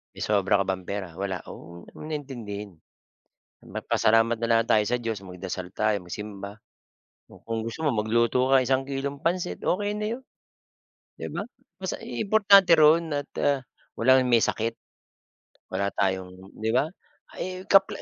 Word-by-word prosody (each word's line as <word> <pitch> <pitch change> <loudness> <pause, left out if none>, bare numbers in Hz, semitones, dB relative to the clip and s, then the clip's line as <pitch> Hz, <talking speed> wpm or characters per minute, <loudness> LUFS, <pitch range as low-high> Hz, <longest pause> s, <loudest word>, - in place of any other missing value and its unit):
May - - -11
sobra 100 -1 +3
ka 100 - +1
bang 95 -1 -2
pera? 100 0 -4
Wala. 95 -1 -3
Oh, 85 0 -11
wag - - -17
mo - - -10
na 155 -1 -3
intindihin. 105 -8 -7 0.8
Magpasalamat 115 +1 +1
na 115 - -1
lang 115 0 +3
tayo 105 -1 +5
sa 120 +3 +1
Diyos, 115 -3 -2
magdasal 90 0 -6
tayo, 105 -1 +1
magsimba, 100 +2 -8 0.6
o - - -17
kung 115 -1 -3
gusto 115 +8 -5
mo 150 - +2
magluto 115 +2 +2
ka 135 - +6
isang 130 +1 +1
kilong 140 +1 -3
pansit, 175 +4 -1
okey 205 +2 0
na 210 - -2
'yon, 260 - -10 1.0
'di - - -4
ba? - - -2 0.4
Basta 190 - -3
i 120 - -4
importante 200 -3 +6
roon 160 +1 +5
at, 145 0 -2 0.2
ah, 140 -1 +3 0.4
walang 130 +2 +5
may 120 -1 +6
sakit, 115 +1 0 1.0
wala 100 - 0
tayong 95 -1 -1 0.3
'di 110 +1 -1
ba? 145 +4 +2 0.4
Ay, 185 0 -5
kapla 195 -1 +4
115 Hz, 165 wpm, -26 LUFS, 100-145 Hz, 1.0 s, ka